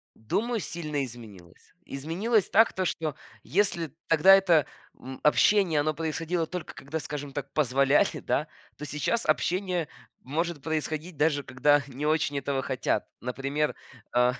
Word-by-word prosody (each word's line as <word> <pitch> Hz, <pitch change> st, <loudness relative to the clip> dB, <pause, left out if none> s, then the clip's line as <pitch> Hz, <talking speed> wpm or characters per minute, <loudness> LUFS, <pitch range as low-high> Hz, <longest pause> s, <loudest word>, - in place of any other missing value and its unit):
думаю, 225 Hz, -, -1 dB
сильно 155 Hz, -6 st, -3 dB
изменилось. 105 Hz, -8 st, -13 dB
Изменилась 180 Hz, -, 0 dB
так, 225 Hz, +2 st, +5 dB
что 155 Hz, -4 st, -2 dB, 0.3 s
если 170 Hz, -8 st, 0 dB
тогда 165 Hz, +4 st, +7 dB
это, 175 Hz, -7 st, +4 dB, 0.3 s
м, 130 Hz, 0 st, -9 dB
общение, 170 Hz, +1 st, +4 dB
оно 155 Hz, +1 st, +1 dB
происходило 165 Hz, +2 st, -2 dB
только 180 Hz, -1 st, -6 dB
когда, 150 Hz, +4 st, -5 dB
скажем 145 Hz, -2 st, -6 dB
так, 140 Hz, -1 st, -6 dB
позволяли, 140 Hz, 0 st, +3 dB
да, 150 Hz, -, 0 dB, 0.3 s
то 150 Hz, -, -6 dB
сейчас 150 Hz, +11 st, -1 dB
общение 180 Hz, -3 st, 0 dB, 0.3 s
может 160 Hz, +3 st, -2 dB
происходить 155 Hz, +1 st, -3 dB
даже 145 Hz, -2 st, +2 dB
когда 145 Hz, +3 st, +3 dB
не 140 Hz, +3 st, -5 dB
очень 150 Hz, -2 st, +1 dB
этого 135 Hz, 0 st, -1 dB
хотят. 130 Hz, -1 st, -1 dB
Например, 135 Hz, +4 st, -2 dB, 0.4 s
а, 125 Hz, 0 st, +3 dB
150 Hz, 135 wpm, -27 LUFS, 140-170 Hz, 0.4 s, тогда